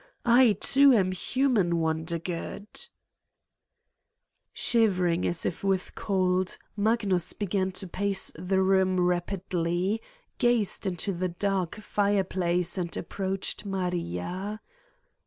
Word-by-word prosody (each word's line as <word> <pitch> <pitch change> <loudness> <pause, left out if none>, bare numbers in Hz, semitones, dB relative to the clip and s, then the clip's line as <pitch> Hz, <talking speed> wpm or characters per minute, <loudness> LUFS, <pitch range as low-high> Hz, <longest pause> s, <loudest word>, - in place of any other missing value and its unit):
I, 240 -1 +6
too, 275 +7 +5
am 190 -5 +3
human, 200 -3 +1
Wondergood! 165 +4 -3 0.5
' - - -56
' - - -7
Shivering 185 -7 +3
as 175 - -1
if 175 - -3
with 195 -2 0
cold, 185 -2 0 0.2
Magnus 205 -4 +1
began 190 -2 -1
to 190 - -4
pace 195 +2 -1
the 190 +3 0
room 190 -1 +3
rapidly, 180 +2 0 0.4
gazed 240 -5 +1
into 190 +2 -2
the 180 +1 -2
dark 185 0 -1
fireplace 190 -4 0
and 170 -1 -3
approached 190 +3 -2
Maria. 185 - -3
190 Hz, 105 wpm, -27 LUFS, 175-205 Hz, 0.5 s, I